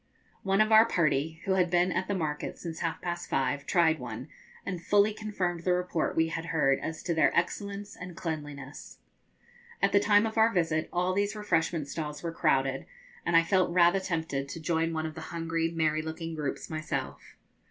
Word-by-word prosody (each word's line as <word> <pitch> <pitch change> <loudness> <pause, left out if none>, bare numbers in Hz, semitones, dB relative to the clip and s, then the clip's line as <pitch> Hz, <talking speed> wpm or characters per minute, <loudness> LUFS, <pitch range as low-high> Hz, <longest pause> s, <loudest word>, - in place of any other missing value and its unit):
One 195 +1 +2
of 215 +1 +2
our 220 +1 +8
party, 160 -2 0
who 195 - 0
had 185 -2 +3
been 175 +1 +3
at 185 - -1
the 200 - -1
market 150 -4 -3
since 165 -2 -6
half 165 -1 -3
past 175 0 -4
five, 135 +2 -1
tried 165 -4 +3
one, 125 +3 -7 0.4
and 180 -3 -4
fully 205 +3 +4
confirmed 195 -5 -3
the 180 - +2
report 180 -2 -1
we 160 0 +2
had 165 0 -4
heard 150 -5 +2
as 160 0 -5
to 175 - 0
their 160 -2 +4
excellence 200 +3 -2
and 180 -2 -9
cleanliness. 145 -4 -6 0.8
At - - +2
the 200 - +5
time 205 +1 +4
of 220 0 -1
our 225 +1 +5
visit 165 -4 0
all 180 +1 0
these 200 +2 0
refreshment 165 -7 0
stalls 150 0 -5
were 170 - -2
crowded, 135 -4 +1 0.4
and 165 - +5
I 165 - +6
felt 185 +2 +2
rather 175 +2 +5
tempted 160 -7 -3
to 165 - -6
join 165 0 0
one 160 -1 -2
of 155 - -4
the - - -8
hungry 165 0 -1
merry 155 -2 0
looking 160 +1 -5
groups 150 -3 -4
myself. 155 0 -5
165 Hz, 195 wpm, -29 LUFS, 155-185 Hz, 0.8 s, our